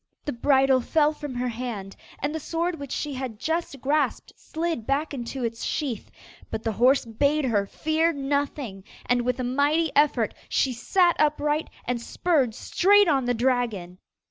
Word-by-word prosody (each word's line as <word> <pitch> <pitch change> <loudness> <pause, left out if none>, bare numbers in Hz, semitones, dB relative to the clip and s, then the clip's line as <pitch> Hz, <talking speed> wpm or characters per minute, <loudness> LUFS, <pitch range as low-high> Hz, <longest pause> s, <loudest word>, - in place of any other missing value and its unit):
The 290 - -2
bridle 265 +1 +3
fell 305 +4 +2
from 295 -4 -7
her 250 0 -1
hand: 225 -5 -5 0.2
and 285 +2 -2
the 320 - -2
sword 330 +2 -2
which 280 -2 -7
she 295 -2 -3
had 255 -4 -5
just 320 +2 -2
grasped 285 -1 0
slid 320 -8 -4
back 285 +3 0
into 255 0 -5
its 230 0 -3
sheath, 265 -9 -3 0.4
but 220 - -4
the 225 - 0
horse 250 +5 +3
bade 280 +6 +1
her 205 -5 +1
fear 315 +6 +1
nothing, 275 - -2 0.2
and 245 0 +2
with 250 +1 -1
a - - -1
mighty 285 +5 +1
effort 280 -6 +3 0.2
she 260 - +1
sat 345 +9 +2
upright 300 0 +1 0.2
and 245 -1 -2
spurred 270 -5 0
straight 405 +2 +4
on 275 -5 +2
the 245 0 +1
dragon. 225 -8 -1
270 Hz, 170 wpm, -25 LUFS, 240-300 Hz, 0.4 s, straight